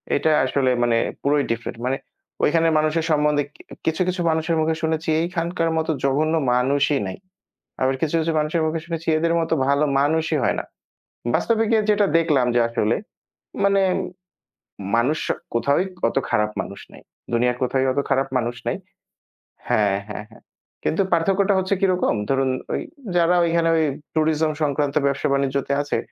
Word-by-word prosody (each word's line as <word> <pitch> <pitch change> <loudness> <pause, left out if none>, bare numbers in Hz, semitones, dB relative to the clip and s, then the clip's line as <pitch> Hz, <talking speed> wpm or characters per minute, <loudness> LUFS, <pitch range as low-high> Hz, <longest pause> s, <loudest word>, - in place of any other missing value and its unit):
এটা 155 +2 +2
আসলে 130 0 +1
মানে 115 -1 +2 0.2
পুরোই 145 0 +2
ডিফারেন্ট 115 0 -4
মানে 135 +1 0 0.5
ঐখানের 165 +1 +3
মানুষের 155 +1 0
সম্বন্ধে 150 -1 +2 0.4
কিছু, 160 +2 0
কিছু 180 0 -1
মানুষের 160 +1 0
মুখে 160 0 +1
শুনেছি 160 0 -1
এইখানকার 170 -1 -1
মত 160 +1 -1 0.2
জঘন্য 150 +4 +1 0.2
মানুষই 140 +3 +2
নাই। 95 - -6 0.6
আবার 130 +1 +2
কিছু, 160 +1 0
কিছু 165 0 -1
মানুষের 155 +2 0
মুখে 160 +1 -1
শুনেছি, 165 -1 -5
এদের 165 +1 +1
মতো 165 0 0
ভালো 140 +2 +3 0.2
মানুষই 155 +2 +1
হয় - - +1
না। - - -4 0.7
বাস্তবিকে 225 -1 +2
যেটা 205 -1 +3
দেখলাম 150 -7 +2
যে, - - +5
আসলে 115 -1 0 0.7
মানে, 195 0 +4 1.1
মানুষ 135 +7 +1 0.3
কোথাওই 140 +10 +2 0.2
অত - - -6
খারাপ 105 0 +1
মানুষ 100 - -7
নাই। - - -14 0.3
দুনিয়ার 125 +1 +2
কোথাওই 130 +1 +1
অত 140 - 0
খারাপ 135 0 +2
মানুষ 120 0 -2
নাই। - - -1 0.9
হ্যাঁ, 100 -2 +2
হ্যাঁ, 105 0 -6
হ্যাঁ। 110 - -18 0.4
কিন্তু 180 +5 +1
পার্থক্যটা 195 +4 +2
হচ্ছে 190 +1 +1
কিরকম, 185 -2 +2 0.2
ধরুন 135 -1 +2 0.7
যারা 175 +1 +4
ওইখানে 165 0 +2
ওই 160 - +3 0.3
ট্যুরিজম 155 0 +1
সংক্রান্ত 145 -1 0
ব্যবসা 140 0 0
বাণিজ্যতে 140 0 0
আছে, 145 - -2
155 Hz, 150 wpm, -22 LUFS, 135-165 Hz, 1.1 s, যে